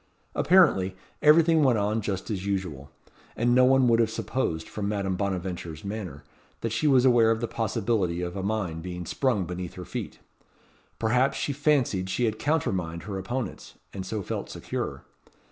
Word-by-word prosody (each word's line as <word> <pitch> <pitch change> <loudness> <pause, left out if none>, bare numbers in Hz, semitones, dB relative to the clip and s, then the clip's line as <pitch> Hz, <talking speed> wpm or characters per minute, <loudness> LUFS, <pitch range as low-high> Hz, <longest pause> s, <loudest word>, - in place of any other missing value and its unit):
Apparently, 95 - +4 0.3
everything 160 +1 +6
went 125 -4 +4
on 105 +2 0
just 100 0 -3
as 95 -3 -3
usual, 90 -9 -3 0.5
and 120 +1 +2
no 125 +1 +6
one 130 0 +5
would 115 -1 +4
have 115 -2 +3
supposed, 95 -9 -2
from 100 -1 -3
Madame 100 -3 -1
Bonaventure's 90 -4 -4
manner, 100 -9 -5 0.4
that 115 - -2
she 115 +7 +1
was 130 -3 +5
aware 120 -3 +5
of 115 0 +2
the 120 - -2
possibility 110 -6 -1
of 90 +1 -4
a 95 - -3
mine 100 -5 -2
being 90 0 -6
sprung 115 - 0
beneath 90 0 -6
her 90 - -7
feet. - - -6 0.8
Perhaps 125 +4 +2
she 145 - -1
fancied 130 -10 +1
she 120 +6 0
had 110 -1 -1
countermined 95 - -1
her 100 -2 -4
opponents, 120 +6 -5 0.2
and 95 - -5
so 100 +2 -4
felt - - -4
secure. - - -5
105 Hz, 170 wpm, -27 LUFS, 90-120 Hz, 0.8 s, everything